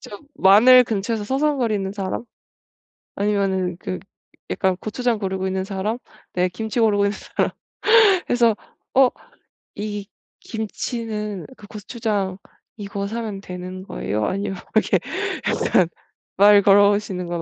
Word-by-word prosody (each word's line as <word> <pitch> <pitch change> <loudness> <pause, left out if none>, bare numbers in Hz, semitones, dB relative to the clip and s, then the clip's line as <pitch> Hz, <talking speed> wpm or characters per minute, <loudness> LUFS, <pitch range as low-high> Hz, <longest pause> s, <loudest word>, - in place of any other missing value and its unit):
좀 205 - -10
마늘 245 +6 +7
근처에서 215 0 -2
서성거리는 250 -6 0
사람 195 +2 -4 0.9
아니면은 195 -3 0
그 185 - -4 0.5
약간 190 -1 +1
고추장 230 +3 -1
고르고 190 -2 -2
있는 190 0 -1
사람 200 +3 -2 0.4
네 180 0 +2
김치 220 +6 -3
고르고 205 -3 +3
있는 205 - -1
사람 - - -1 0.8
그래서 235 -3 +3 0.4
"어 260 -1 +6 0.7
이 205 -1 -5 0.3
김치는 220 -2 -4
그 205 - -13
고추장 205 -3 -3 0.4
이거 200 -1 -4
사면 215 -2 -4
되는 185 0 -7
거예요?" 105 - -3
아니면 195 0 -2 0.2
이렇게 220 - +3 0.5
일단 180 - +2 0.5
말을 205 +1 +7
걸어 200 0 +6
보시는 200 -3 -2
건 170 -1 -3
205 Hz, 270 characters per minute, -22 LUFS, 190-220 Hz, 0.9 s, 마늘